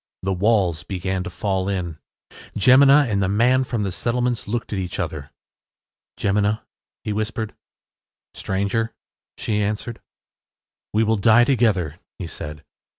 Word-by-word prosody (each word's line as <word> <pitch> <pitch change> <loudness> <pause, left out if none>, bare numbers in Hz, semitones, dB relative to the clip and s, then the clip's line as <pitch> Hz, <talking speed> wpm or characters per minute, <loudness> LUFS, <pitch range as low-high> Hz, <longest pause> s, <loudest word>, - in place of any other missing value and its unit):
The 95 0 0
walls 95 -5 +2
began 95 +1 -3
to - - -4
fall 95 +1 -1
in. 85 -5 -3 0.6
Jemina 135 +5 +6
and 100 -3 0
the 95 - +1
man 125 +6 +3
from 120 -4 -2
the 100 - -2
settlements 120 +5 -1
looked 115 +1 -3
at 100 - -1
each 90 0 -4
other. 75 -6 -4 0.9
“Jemina,” 105 +2 +1 0.4
he 105 - -2
whispered. 110 +1 -3 0.8
“Stranger,” 100 +4 -2 0.4
she 105 -1 -1
answered. 110 +3 -3 0.9
“We 110 +2 +2
will 110 0 +2
die 110 +4 +6
together,” 105 - +1 0.2
he 95 - -5
said. 75 -2 -7
105 Hz, 135 wpm, -22 LUFS, 95-115 Hz, 0.9 s, Jemina